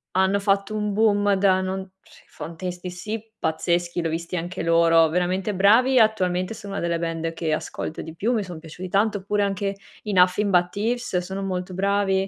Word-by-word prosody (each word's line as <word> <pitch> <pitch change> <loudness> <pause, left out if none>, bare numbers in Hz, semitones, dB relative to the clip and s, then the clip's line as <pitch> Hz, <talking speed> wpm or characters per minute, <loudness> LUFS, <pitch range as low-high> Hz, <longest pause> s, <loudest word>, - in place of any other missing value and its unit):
hanno 190 +2 +3
fatto 200 +1 0
un 210 -1 -1
boom 205 -1 +3
da 190 -1 +3
non 190 0 -4
sì, - - -20
Fontaines 180 +2 -7
D.C. 215 +5 -6
pazzeschi, 175 +2 -1
l'ho 165 - -1
visti 170 +3 -4
anche 175 +1 -4
loro, 165 -1 +5
veramente 180 +4 0
bravi. 235 +7 +5
Attualmente 185 -3 +2
sono 205 -3 -8
una 200 - -3
delle 170 0 0
band 165 0 -3
che 165 -1 -2
ascolto 155 - -4
di 160 0 -9
più, 220 +8 0
mi 220 -3 0
son 180 -3 -8
piaciuti 165 +3 -8
tanto, 205 +2 +1
oppure 205 +2 0
anche 200 0 -1 0.3
i 210 -2 -3
Nothing 185 +3 +4
But 180 -1 +3
Thieves 220 +1 -2
sono 190 +2 -3
molto 185 -1 -3
bravi; 195 0 +1
190 Hz, 185 wpm, -24 LUFS, 175-205 Hz, 0.3 s, loro